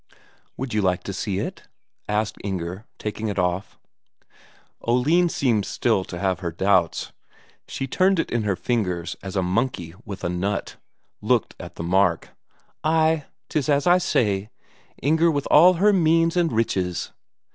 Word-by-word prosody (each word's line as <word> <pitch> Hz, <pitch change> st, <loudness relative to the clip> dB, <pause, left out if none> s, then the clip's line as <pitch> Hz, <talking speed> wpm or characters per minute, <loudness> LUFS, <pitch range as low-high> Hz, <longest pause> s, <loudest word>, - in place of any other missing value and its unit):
"Would 130 Hz, -2 st, -4 dB
you 105 Hz, -, +2 dB
like 90 Hz, -2 st, 0 dB
to 100 Hz, -, -5 dB
see 95 Hz, 0 st, -2 dB
it?" -, -, -5 dB, 0.4 s
asked 105 Hz, +1 st, -1 dB
Inger, 95 Hz, +1 st, -4 dB
taking 105 Hz, +1 st, -4 dB
it 100 Hz, -, -3 dB
off. 90 Hz, +1 st, -1 dB, 1.0 s
Oline 150 Hz, +9 st, +3 dB
seemed 120 Hz, -9 st, +1 dB
still 105 Hz, -1 st, 0 dB
to 85 Hz, -, -7 dB
have 95 Hz, -1 st, 0 dB
her 85 Hz, -2 st, -3 dB
doubts; 90 Hz, -1 st, +1 dB, 0.6 s
she 135 Hz, -, -4 dB
turned 185 Hz, +8 st, +2 dB
it 165 Hz, -, -1 dB
in 120 Hz, -, +1 dB
her 105 Hz, -3 st, 0 dB
fingers 90 Hz, -7 st, -2 dB
as 95 Hz, 0 st, -7 dB
a 95 Hz, -, +1 dB
monkey 95 Hz, -3 st, -1 dB
with 100 Hz, -3 st, -8 dB
a -, -, 0 dB
nut, 95 Hz, +3 st, -2 dB, 0.4 s
looked -, -, +1 dB
at -, -, -9 dB
the -, -, -5 dB
mark. 90 Hz, -1 st, +2 dB, 0.5 s
"Ay, 160 Hz, -1 st, +2 dB, 0.2 s
'tis 150 Hz, -1 st, -1 dB
as 140 Hz, -1 st, +2 dB
I 180 Hz, +1 st, +5 dB
say; 105 Hz, -, 0 dB, 0.5 s
Inger 160 Hz, +4 st, +3 dB
with 145 Hz, -3 st, -1 dB
all 175 Hz, +5 st, +8 dB
her 205 Hz, +4 st, +4 dB
means 165 Hz, -2 st, +3 dB
and 175 Hz, -2 st, +2 dB
riches." 95 Hz, -6 st, -1 dB
105 Hz, 155 wpm, -23 LUFS, 95-150 Hz, 1.0 s, all